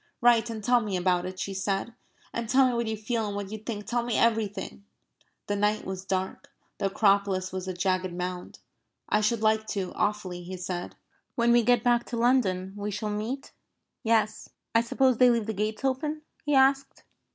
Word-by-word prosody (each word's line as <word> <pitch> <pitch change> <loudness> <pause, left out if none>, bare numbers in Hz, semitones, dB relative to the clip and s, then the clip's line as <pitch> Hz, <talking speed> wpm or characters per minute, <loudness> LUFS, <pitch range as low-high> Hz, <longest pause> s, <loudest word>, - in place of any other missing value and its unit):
"Write 240 -2 +4
and 220 -2 -5
tell 245 +3 +4
me 210 -4 -2
about 180 0 +1
it," 185 0 -7
she 195 - -3
said. 195 +4 -2 0.4
"And 230 -1 -3
tell 265 +1 +5
me 250 - 0
what 235 -1 -1
you 220 0 -2
feel 220 +1 -2
and 205 - -4
what 200 -1 -5
you 220 - -5
think. 210 -1 -5
Tell 240 0 0
me 235 -1 -1
everything." 215 -4 0 0.6
The 205 - -1
night 210 +1 +1
was 190 0 -5
dark. 190 0 -3 0.3
The 195 - +1
Acropolis 195 -2 +2
was 185 0 -5
a 185 - -2
jagged 185 0 0
mound. 180 0 -5 0.5
"I 210 - +3
should 215 +1 +1
like 220 0 +2
to, 195 -4 -3
awfully," 195 -4 -2
he 185 +1 -7
said. 180 -1 -5 0.4
"When 235 -1 +3
we 240 0 +6
get 245 0 +3
back 240 -1 +3
to 235 - -4
London, 200 -7 +2
we 205 0 -4
shall 210 +1 -3
meet..." 225 +6 -4 0.5
"Yes." 220 -3 +1 0.2
"I 230 - +5
suppose 255 +1 +2
they 250 -1 +7
leave 235 -3 +2
the 220 - -2
gates 215 +5 -2
open?" 300 +4 -1 0.2
he 295 -1 +2
asked. 270 +1 +3
215 Hz, 195 wpm, -27 LUFS, 190-235 Hz, 0.6 s, they